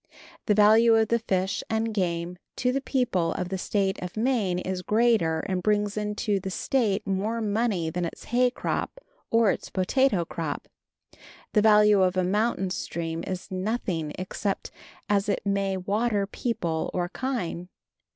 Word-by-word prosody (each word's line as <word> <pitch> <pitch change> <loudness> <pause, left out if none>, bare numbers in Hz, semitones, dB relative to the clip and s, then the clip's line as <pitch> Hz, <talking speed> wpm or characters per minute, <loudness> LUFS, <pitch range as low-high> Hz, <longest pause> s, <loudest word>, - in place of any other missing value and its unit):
The 210 - +4
value 220 +2 +6
of 220 -1 +3
the 235 - +2
fish 190 -3 -1
and 225 0 0
game 175 -2 -2 0.2
to 250 - +1
the 275 +2 -1
people 245 - 0
of 180 -1 -3
the 190 -1 -3
State 195 0 0
of 180 +3 -6
Maine 220 -6 +1
is 185 0 -3
greater 215 -7 +2
and 185 -1 -2
brings 210 0 +1
into 210 -1 -1
the 190 +1 -5
State 210 0 0
more 200 +4 -1
money 210 -6 0
than 175 +1 -2
its 165 - -7
hay 250 +1 +2
crop 250 - -3 0.3
or 230 -3 +4
its - - -5
potato 195 -1 +2
crop. 160 -3 -4 0.9
The 210 - +4
value 210 -1 +6
of 185 0 +2
a 185 - +3
mountain 195 0 0
stream 165 -2 -3
is 185 +1 -5
nothing 185 -5 -2
except 195 +2 -3 0.4
as 205 0 +1
it 200 - -1
may 195 -1 0
water 205 +2 0
people 175 -7 -2
or 175 -1 0
kine. 185 -6 -3
200 Hz, 160 wpm, -26 LUFS, 180-225 Hz, 0.9 s, value